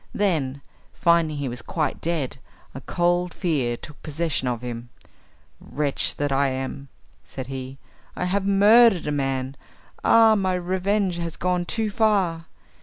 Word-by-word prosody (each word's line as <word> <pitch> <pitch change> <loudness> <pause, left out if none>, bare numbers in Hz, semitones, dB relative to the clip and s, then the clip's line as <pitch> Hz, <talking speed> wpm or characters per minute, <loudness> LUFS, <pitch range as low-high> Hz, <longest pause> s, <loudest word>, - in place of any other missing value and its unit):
Then, 150 -9 0 0.3
finding 170 -3 +2
he 140 -1 -2
was 120 -1 -5
quite 160 +2 -2
dead, 155 -6 -2 0.4
a 135 - -8
cold 175 +2 0
fear 135 -10 0
took 150 - -12
possession 155 -3 -2
of 120 -1 -2
him. 120 0 -6 0.7
"Wretch 145 -2 -1
that 145 -1 -1
I 140 +1 +2
am," 135 +1 -4 0.4
said 130 - -7
he, 130 0 -7 0.4
"I - - -2
have 195 +2 0
murdered 205 +1 +5
a 150 - -1
man. 135 -2 -1 0.5
Ah, 225 -1 +6
my 190 -3 +1
revenge 185 +1 0
has 170 -1 -4
gone 180 -1 0
too 220 +2 -2
far. 195 -7 +1
165 Hz, 145 wpm, -24 LUFS, 135-185 Hz, 0.7 s, Ah